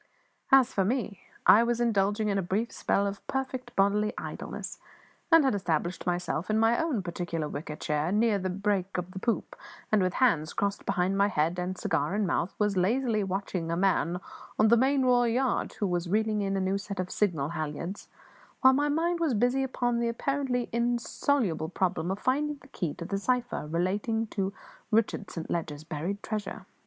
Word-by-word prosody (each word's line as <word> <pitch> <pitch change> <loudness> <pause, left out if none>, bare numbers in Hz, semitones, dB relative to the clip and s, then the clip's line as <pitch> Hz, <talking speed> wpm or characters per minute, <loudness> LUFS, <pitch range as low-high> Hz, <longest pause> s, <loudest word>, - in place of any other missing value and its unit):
As 265 -2 +6
for 195 - +2
me, 210 -3 -2 0.2
I 215 - +8
was 235 0 +1
indulging 210 -2 +1
in 200 -1 +1
a - - +1
brief 195 +6 -1
spell 200 - +1
of 200 0 -4
perfect 260 -2 -3
bodily 205 +2 +2
idleness, - - -6 0.5
and 330 -2 +8
had 265 - +3
established 175 -2 -1
myself 175 0 -1
in 215 - +2
my 225 +4 +3
own 290 - -1
particular 170 -3 -3
wicker 150 +1 -5
chair, 150 +2 -1
near 215 0 +3
the 185 0 -2
break 195 0 -1
of 180 0 -4
the 190 - -6
poop, 230 +3 -1 0.4
and, 215 -2 +4
with 185 -1 0
hands 180 - +2
crossed 200 0 -2
behind 195 0 +1
my 200 - +5
head 170 -2 0
and 180 +1 -3
cigar 150 +3 0
in 210 0 +1
mouth, 175 0 -1
was 210 -1 +1
lazily 215 +3 +1
watching 190 -3 -3
a 170 - 0
man 180 -2 +1 0.4
on 215 - +5
the 235 - +7
main 265 +3 +3
royal 245 -1 +4
yard 250 +2 0
who 210 - -2
was 175 -2 -1
reeving 215 +1 +1
a 200 - -1
new 190 +1 0
set 200 -1 -6
of 185 0 -2
signal 160 -9 0
halliards, 165 +3 -5 0.5
while 260 0 +7
my 290 +2 +2
mind 335 +3 +1
was 315 -8 +1
busy 245 +5 +2
upon 245 -2 0
the 235 0 +1
apparently 255 0 -1
insoluble 235 - 0
problem 180 -2 -1
of 190 - -1
finding 290 +6 0
the 265 - -16
key 170 - -3
to 170 - -7
the 195 +2 -2
cipher 245 -7 -1
relating 200 +7 0
to 195 -3 -2 0.4
Richard 220 -3 +1
Saint 165 -2 -6
Leger's 155 -3 -3
buried 170 +6 -4
treasure. 215 -1 -4
200 Hz, 190 wpm, -28 LUFS, 180-235 Hz, 0.5 s, I